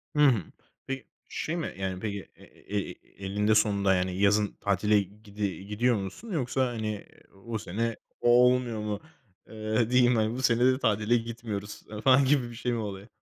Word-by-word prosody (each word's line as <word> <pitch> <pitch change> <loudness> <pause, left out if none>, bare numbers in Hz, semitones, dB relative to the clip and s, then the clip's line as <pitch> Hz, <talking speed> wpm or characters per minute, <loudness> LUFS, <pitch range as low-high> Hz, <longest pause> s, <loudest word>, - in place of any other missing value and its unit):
Hı - - 0
hı. 115 -10 +3 0.4
Peki, 135 0 -4 0.2
şey 160 - -3
mi, 165 - -3
yani, 95 -1 -3
peki, 100 -1 -5
e - - -18 0.3
e 100 - -2 0.3
eninde 105 +2 +2
sonunda, 100 -2 +3
yani, 90 0 -1
yazın 105 +1 +3
tatile, 105 +1 +2
gidi 100 -1 -5
gidiyor 120 +3 +2
musun 100 - -6
yoksa, 130 -4 0
hani, 110 -3 -4 0.4
o 115 -1 -2
sene 115 +3 -2 0.3
olmuyor 125 -1 +4
mu, 105 -1 -3 0.5
eee, 110 +1 -1
diyeyim, 125 -1 +5
hani, 110 0 +1
"Bu 130 - -3
sene 120 -1 +3
de 130 +1 +4
tatile 110 0 +2
gitmiyoruz." 115 -3 -5 0.2
ı 105 - -6
falan 135 +2 +5
gibi 130 -3 +2
bir 120 - -10
şey 125 +1 -2
mi 120 - 0
oluyor? 100 -1 -5
110 Hz, 175 wpm, -28 LUFS, 100-120 Hz, 0.5 s, diyeyim